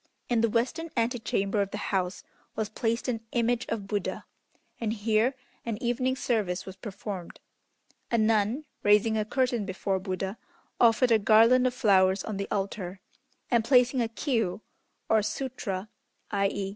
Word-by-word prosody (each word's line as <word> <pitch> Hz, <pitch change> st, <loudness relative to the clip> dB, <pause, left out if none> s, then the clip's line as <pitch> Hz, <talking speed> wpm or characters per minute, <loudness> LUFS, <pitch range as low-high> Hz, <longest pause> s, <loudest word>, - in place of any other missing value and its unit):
In 235 Hz, -2 st, +2 dB
the 230 Hz, -, +3 dB
western 245 Hz, +9 st, -1 dB
antechamber 225 Hz, -4 st, 0 dB
of 200 Hz, -, -1 dB
the 205 Hz, -, -5 dB, 0.2 s
house 185 Hz, -1 st, -1 dB, 0.3 s
was 220 Hz, -1 st, -2 dB
placed 230 Hz, +2 st, -1 dB
an 230 Hz, -3 st, -1 dB
image 240 Hz, 0 st, +1 dB
of 220 Hz, -3 st, -3 dB
Buddha, 200 Hz, -1 st, -3 dB, 0.5 s
and 220 Hz, -2 st, -1 dB
here 225 Hz, +4 st, +1 dB, 0.3 s
an 230 Hz, -3 st, -3 dB
evening 255 Hz, +2 st, 0 dB
service 210 Hz, -9 st, -1 dB
was 190 Hz, -, -8 dB
performed. 195 Hz, -2 st, -7 dB, 0.7 s
A 235 Hz, -, +2 dB
nun, 220 Hz, +5 st, +2 dB, 0.2 s
raising 210 Hz, +2 st, +4 dB
a 215 Hz, -, +1 dB
curtain 245 Hz, 0 st, 0 dB
before 190 Hz, 0 st, -2 dB
Buddha, 190 Hz, +2 st, -4 dB, 0.4 s
offered 235 Hz, +1 st, +4 dB
a 225 Hz, -, +6 dB
garland 230 Hz, +4 st, +5 dB
of 250 Hz, -, -2 dB
flowers 190 Hz, -5 st, +3 dB
on 215 Hz, -3 st, -4 dB
the 200 Hz, -, -4 dB
altar, 195 Hz, -2 st, -3 dB, 0.5 s
and 235 Hz, -2 st, +4 dB
placing 250 Hz, +1 st, +4 dB
a 230 Hz, -, +1 dB
Kiô 225 Hz, -, -1 dB, 0.5 s
(or 220 Hz, -1 st, +4 dB
Sutra, 215 Hz, -3 st, -3 dB, 0.4 s
i.e. 200 Hz, -1 st, 0 dB
220 Hz, 150 wpm, -28 LUFS, 200-240 Hz, 0.7 s, a